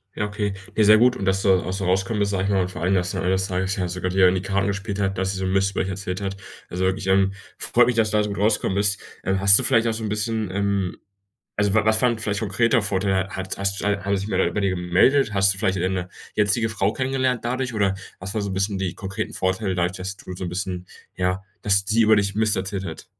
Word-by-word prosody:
Ja, 105 - -1
okay. 105 -1 -2 0.2
Ne, 110 - +4
sehr 105 +1 +7
gut. 125 +2 +4
Und 100 - -4
dass 95 0 +1
du 100 - +4
auch 90 0 0
so 95 -1 -3
rauskommen 95 +4 0
bist, 100 0 +1
sage 95 -1 0
ich - - -1
mal, 95 -2 +2
und 90 +1 -2
vor - - -8
allem, 95 +3 +1
dass 90 -1 0
am - - -2
Ende 90 - +1
des 95 +1 0
Tages 95 +1 -1
ja 90 -2 -1
sogar 90 +1 -3
die, 95 +2 -1
ähm, 90 -1 +6
die 90 - -1
Karten 100 0 0
gespielt 100 0 -3
hat, 95 -1 -1
dass 95 +1 0
sie - - -5
so' 95 - -2
n 95 - -1
Mist 95 0 +2
über - - -1
euch 95 - -2
erzählt 95 0 -4
hat. 100 0 -4 0.3
Also, 95 +1 0
ich, 95 0 -4
ähm, 95 0 +3 0.2
freut 120 0 +3
mich, 125 - +1
dass 110 -2 +2
du 105 - +2
da 105 - +3
so 105 - -3
gut 100 - -4
rausgekommen 105 -2 +1
bist. 100 0 +1 0.2
Ähm, 95 +1 0
hast 100 +1 +6
du - - -2
vielleicht 115 -2 +3
auch 115 - +1
so 110 - -5
'n 110 - -2
bisschen, 110 -1 -2
ähm 100 -2 -1 0.6
also, 105 -1 +1
wa 110 -1 +3
was 110 0 +3
war 125 - +4
'n 115 - -3
vielleicht 105 -2 -2
konkreter 115 +3 +2
Vorteil? 95 -1 0
Hat 95 0 -5
hast 100 0 -1
hat 100 -1 0
sich 100 - -5
wer - - +1
bei 105 - -1
dir 100 -1 +1
gemeldet? 95 +7 +2
Hast 95 0 +4
du 95 - -9
vielleicht 95 -3 0
deine 90 0 -1 0.3
jetzige 105 +2 +2
Frau 100 -1 0
kennengelernt 130 -2 -1
dadurch 125 0 -2
oder 100 -2 +1 0.2
was 95 +2 -5
war 110 - 0
so 100 - -3
'n - - -3
bisschen 100 +1 -1
die 95 -2 -2
konkreten 95 -1 -5
Vorteile, 95 +1 -1
dadurch, 90 +1 -1
dass 95 +1 -5
du 90 - -9
so 90 - -6
'n - - -3
bisschen 90 0 -4 0.3
ja 90 +1 -1 0.2
,dass 95 -1 +2
sie 110 +2 +3
über 110 0 +5
dich 100 -1 0
Mist 110 -1 +2
erzählt 95 +1 -3
hat? 80 - -8
100 Hz, 280 wpm, -23 LUFS, 95-105 Hz, 0.6 s, sehr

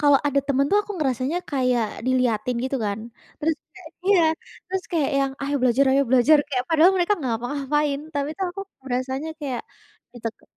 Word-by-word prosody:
Kalau 285 -2 +6
ada 280 -1 +2
teman 275 0 +2
tuh, 410 - +5
aku 415 - -6
ngerasanya 265 +3 0
kayak 250 -5 +1 0.2
dilihatin 250 -2 +1
gitu 270 +1 -1
kan. 200 +1 -2 0.4
Terus 315 0 +1 0.2
kayak - - -12 0.2
iya, 390 -3 +5 0.5
terus 375 0 -2
kayak 315 -4 +1
yang 275 -1 +1
"Ayo 285 +1 -1
belajar! 255 +2 +4
Ayo 275 - +4
belajar!" 260 +4 +6
kayak 255 -3 -1
padahal 330 +3 +5
mereka 360 +3 +2
enggak 265 -9 -2
ngapa 245 - -3
ngapain 285 0 0
tapi 285 0 -1
tuh, 385 - 0
aku 395 - -6 0.2
berasanya 265 +4 -2
kayak 265 -5 -3 0.5
diteke 230 -2 -6
275 Hz, 180 wpm, -24 LUFS, 255-310 Hz, 0.5 s, Kalau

